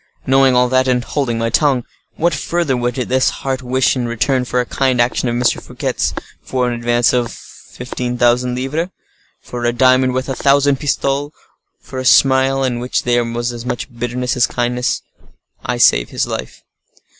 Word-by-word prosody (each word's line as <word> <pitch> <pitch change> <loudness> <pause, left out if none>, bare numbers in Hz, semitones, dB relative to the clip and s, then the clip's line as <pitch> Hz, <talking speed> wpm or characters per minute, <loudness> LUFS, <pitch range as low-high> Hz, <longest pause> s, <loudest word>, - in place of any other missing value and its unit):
Knowing 135 -1 +4
all 125 0 +4
that, 130 +1 +2
and 125 -1 +1
holding 125 -5 -2
my 115 0 -1
tongue, 135 -1 +2 0.3
what 170 +1 +1
further 150 0 -1
would 120 0 -1
this 130 0 +1
heart 135 -1 -4
wish 130 +1 +1
in 125 -2 -2
return 125 +3 0
for 125 0 -1
a 125 - 0
kind 130 0 0
action 120 +1 +1
of 120 - -2
M. 120 - -1
Fouquet's, 120 - -1 0.3
for 125 -1 -1
an 120 - -1
advance 120 0 +1
of 120 -1 0
fifteen 125 0 -7
thousand 125 +1 +2
livres, 150 +7 -2 0.5
for 120 -1 -7
a 120 - +2
diamond 130 +1 +3
worth 130 +1 -2
a 135 - -2
thousand 140 0 +2
pistoles, 140 0 -1 0.5
for 130 - -8
a - - -3
smile 135 +1 +4
in 125 -2 -1
which 125 +1 -1
there 120 0 +2
was 120 +1 -3
as 120 -1 -7
much 125 +1 -5
bitterness 120 +1 -2
as 120 -2 +3
kindness?—I 125 0 -4
save 85 - +4
his - - -1
life." - - -6
125 Hz, 180 wpm, -17 LUFS, 120-130 Hz, 0.5 s, Knowing